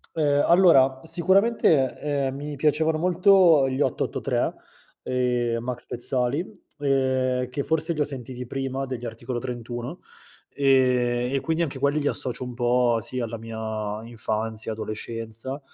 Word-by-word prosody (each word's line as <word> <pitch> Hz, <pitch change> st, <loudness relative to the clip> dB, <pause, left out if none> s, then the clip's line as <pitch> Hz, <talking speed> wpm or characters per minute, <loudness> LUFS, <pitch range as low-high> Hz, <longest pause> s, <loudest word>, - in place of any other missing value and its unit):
Ehm, 145 Hz, -2 st, +2 dB
allora 135 Hz, -7 st, +5 dB
sicuramente, 185 Hz, -, +2 dB
ehm, 140 Hz, -2 st, -1 dB
mi 145 Hz, +1 st, -6 dB
piacevano 155 Hz, +2 st, +1 dB
molto 180 Hz, -4 st, +5 dB
gli 130 Hz, +2 st, -2 dB
883, -, -, -1 dB, 0.5 s
ehm, 125 Hz, -2 st, 0 dB
Max 125 Hz, -1 st, -5 dB
Pezzali, 125 Hz, +6 st, -1 dB, 0.3 s
ehm, 130 Hz, -2 st, +1 dB
che 140 Hz, +2 st, -3 dB
forse 160 Hz, +1 st, 0 dB
li 155 Hz, -, -7 dB
ho -, -, +5 dB
sentiti 125 Hz, -2 st, -7 dB
prima 135 Hz, +1 st, -3 dB
degli 125 Hz, -2 st, -6 dB
Articolo 120 Hz, +2 st, -5 dB
31, 120 Hz, +4 st, -6 dB, 0.5 s
ehm, 125 Hz, -2 st, +2 dB
e 135 Hz, -, +2 dB
quindi 160 Hz, +4 st, 0 dB
anche 135 Hz, -4 st, -4 dB
quelli 140 Hz, +2 st, +1 dB
li 145 Hz, -, -1 dB
associo 130 Hz, 0 st, -3 dB
un 125 Hz, -, -6 dB
po', 120 Hz, 0 st, +2 dB
sì 130 Hz, -, -4 dB
alla 115 Hz, -1 st, -4 dB
mia 110 Hz, -1 st, -5 dB
infanzia, 110 Hz, -1 st, -3 dB
adolescenza; 115 Hz, +4 st, -3 dB
130 Hz, 135 wpm, -25 LUFS, 120-145 Hz, 0.5 s, allora